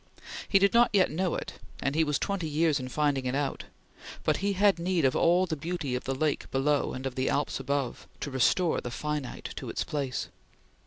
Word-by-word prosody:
He 195 - +6
did 195 0 +4
not 235 0 +6
yet 190 -3 +4
know 180 +2 0
it, - - -6 0.2
and 140 - -1
he 160 +2 +3
was 150 -2 +1
twenty 195 -6 -2
years 155 -1 +2
in 130 0 -5
finding 140 -2 0
it 125 - -1
out; 140 -1 -2 0.6
but - - +2
he 200 +1 0
had 200 -1 +3
need 175 -3 +1
of 130 - +3
all 175 +2 +4
the 165 - -2
beauty 160 -3 -3
of 125 - -3
the 135 - -1
Lake 150 +1 -1
below 140 +2 +1
and 130 +1 -6
of 135 - -2
the 130 0 0
Alps 145 - 0
above, 135 -2 -2
to 145 - -3
restore 160 +6 +2
the 125 - -5
finite 150 +1 -4
to - - -5
its - - -2
place. 140 -4 -3
150 Hz, 215 wpm, -29 LUFS, 135-175 Hz, 0.6 s, He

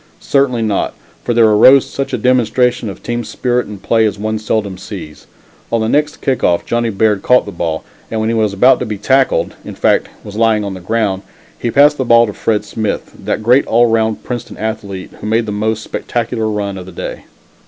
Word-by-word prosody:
Certainly 130 -4 +1
not, 105 -3 -1 0.3
for - - -1
there 115 -1 +6
arose 110 +6 +6
such 135 - -4
a - - -1
demonstration 125 -2 +1
of 95 - -10
team 120 0 -2
spirit 125 +1 -1
and 100 -2 -10
play 115 -1 +2
as 105 - -3
one 110 +1 -2
seldom 105 -2 -1
sees. 85 -8 -9 0.4
On 115 - +2
the 110 - 0
next 150 +4 0
kick 130 -2 -1
off 85 -1 +2
Johnnie 120 0 0
Baird 105 -1 +1
caught 125 +4 +4
the 100 - -6
ball, 85 -3 -3 0.3
and 110 - -2
when 110 - 0
he 115 - 0
was 110 -2 +1
about 125 +7 +4
to - - -2
be 105 -2 -4
tackled 130 +6 +1
in - - -8
fact, - - +2 0.2
was 105 - -9
lying 110 -1 +2
on 100 -1 -4
the 95 - -7
ground 100 0 -1 0.4
he 120 - -1
passed 145 +4 +5
the 130 - 0
ball 115 -1 +5
to 105 - -5
Fred 105 0 -1
Smith, 105 +1 -3
that 110 - -3
great 125 +5 +4
all 120 +2 +4
round 110 -1 0
Princeton 120 -2 -6
athlete, 105 -4 -5
who - - -5
made 110 +1 +1
the 105 - -4
most 110 +1 -1
spectacular 115 -2 -2
run 100 -2 -3
of 90 - -10
the - - -9
day. - - -7
110 Hz, 215 wpm, -15 LUFS, 105-120 Hz, 0.4 s, there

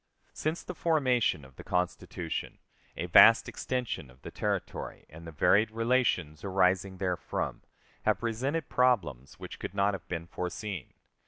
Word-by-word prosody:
Since 155 +2 -2
the 180 - -6
formation 130 - +1
of 65 -1 -18
the - - -9
Constitution, 90 0 -3 0.4
a 85 - -2
vast 110 +6 +7
extension 125 - -3
of 65 +1 -20
territory - - -3
and 80 +2 -11
the - - -7
varied 105 +8 +3
relations 115 -9 0
arising 95 -1 +1
therefrom 90 -2 -2 0.4
have - - +2
presented 130 +7 -2
problems 95 - +1
which - - -9
could 100 - -6
not 100 0 +2
have 95 - -7
been 85 -2 -4
foreseen. 90 - -5
95 Hz, 140 wpm, -30 LUFS, 85-125 Hz, 0.4 s, vast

